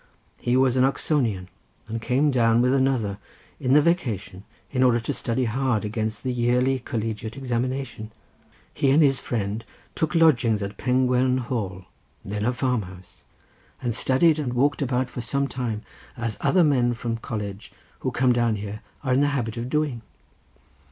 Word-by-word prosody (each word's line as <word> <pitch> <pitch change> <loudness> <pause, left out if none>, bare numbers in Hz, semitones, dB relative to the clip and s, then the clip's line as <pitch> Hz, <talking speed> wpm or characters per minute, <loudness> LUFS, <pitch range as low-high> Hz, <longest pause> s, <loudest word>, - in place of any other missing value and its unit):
He 120 +1 +1
was 130 -1 +3
an 130 - +4
Oxonian, 125 - 0 0.4
and 115 +1 -4
came 135 +6 +2
down 115 -3 +3
with 125 +2 +3
another 130 -7 +1 0.4
in 130 -2 +1
the 150 +1 +6
vacation 115 - -1 0.3
in 130 - 0
order 125 -2 +4
to 115 - -3
study 125 +2 -1
hard 120 -2 0
against 110 0 -3
the 130 - -1
yearly 125 +2 +2
collegiate 115 -2 -4
examination. 125 -3 -3 0.6
He 135 - +1
and 150 +4 +5
his 135 -2 +3
friend 110 -1 -3 0.3
took 160 +1 -1
lodgings 125 -10 +4
at 100 +1 -6
Pengwern 125 0 +2
Hall, 105 -7 -3 0.4
then 105 +1 -3
a 120 - +3
farm 125 -2 0
house, 90 -1 -13 0.5
and 120 -3 -2
studied 150 +7 +3
and 130 -5 -2
walked 140 +4 +1
about 130 -1 0
for 125 - -5
some 140 +4 0
time, 120 -5 -4 0.3
as 115 -3 -2
other 185 - +4
young 155 - +5
men 120 -3 +2
from 115 -1 -3
college, 105 -3 -6 0.3
who - - -1
come 125 0 +2
down 120 -2 +2
here, 105 +1 -6 0.2
are 130 -2 +1
in 130 - +3
the 145 - +4
habit 115 -3 -3
of 120 +1 -4
doing. 150 -5 -1
125 Hz, 170 wpm, -24 LUFS, 110-130 Hz, 0.6 s, the